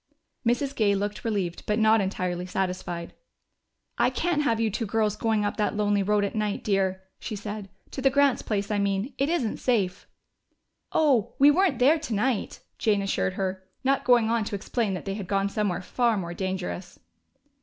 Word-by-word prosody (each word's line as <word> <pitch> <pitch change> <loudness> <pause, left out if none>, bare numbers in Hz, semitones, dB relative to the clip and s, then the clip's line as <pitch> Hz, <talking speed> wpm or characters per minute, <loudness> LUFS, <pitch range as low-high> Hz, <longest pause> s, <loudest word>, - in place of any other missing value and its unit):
Mrs. 265 +4 0
Gay 205 -2 +3
looked 205 +1 -3
relieved 195 -6 -2
but 210 - +1
not 220 0 +4
entirely 180 -2 -2
satisfied. 180 -2 -3 0.9
"I - - +4
can't 345 -4 0
have 230 -6 +1
you 225 -1 +1
two 220 +2 -2
girls 215 -1 +1
going 220 -1 0
up 205 - -2
that 210 0 0
lonely 205 -1 +2
road 205 +1 +2
at 200 - -4
night, 210 -2 -2
dear," 190 -2 0 0.2
she 220 - -5
said. 205 -1 -6 0.2
"To 270 - -5
the 270 - +5
Grants' 280 -1 +3
place, 205 -1 -2
I 205 - +1
mean. 200 +6 -1
It 275 +2 +2
isn't 300 -10 0
safe." 200 -7 0 0.8
"Oh, 260 -8 +2
we 285 +2 +7
weren't 355 -4 +2
there 285 +7 +4
tonight," 245 -4 -1 0.2
Jane 205 -2 +2
assured 195 -1 0
her, 190 0 -3 0.2
not 270 +1 +2
going 245 -3 +4
on 230 -1 +2
to 205 - -3
explain 205 0 -1
that 180 - -7
they 195 - -2
had 200 -2 -5
gone 195 0 +1
somewhere 200 -4 -1
far 235 +2 +1
more 175 -3 -4
dangerous. 185 0 -4
210 Hz, 185 wpm, -26 LUFS, 195-235 Hz, 0.9 s, we